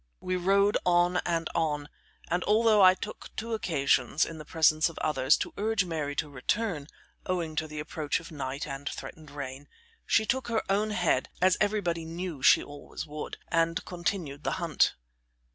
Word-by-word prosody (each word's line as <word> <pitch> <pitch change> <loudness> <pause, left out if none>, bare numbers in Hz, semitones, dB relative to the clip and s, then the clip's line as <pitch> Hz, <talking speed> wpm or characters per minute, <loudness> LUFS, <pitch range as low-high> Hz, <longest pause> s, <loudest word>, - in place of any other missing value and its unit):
We 185 0 -2
rode 200 +3 +3
on 175 0 +3
and 165 -2 0
on, 150 -3 0 0.4
and 175 +1 0
although 215 0 +4
I 185 -1 +8
took 210 - -7
two 230 +1 -4
occasions, 145 - +2
in 165 -1 -8
the 155 - -9
presence 155 0 +3
of 165 - -12
others, 135 -1 +3
to - - -4
urge 210 -2 +1
Mary 155 -4 -3
to 155 - -1
return, 150 - -2 0.4
owing 170 -4 -1
to 155 - 0
the 150 0 -7
approach 150 0 -2
of 165 - -12
night 140 -1 -4
and 140 -1 -5
threatened 155 -2 -8
rain, 140 0 -7 0.4
she 220 - +3
took 260 +3 -1
her 230 -2 0
own 210 +2 +2
head, 175 -10 +1
as 185 0 +4
everybody 200 -6 0
knew 165 -2 -5
she - - +6
always 145 +1 -8
would, 150 0 -6
and 165 +1 +1
continued 170 -5 -3
the - - 0
hunt. 170 -4 +2
165 Hz, 175 wpm, -29 LUFS, 150-185 Hz, 0.4 s, I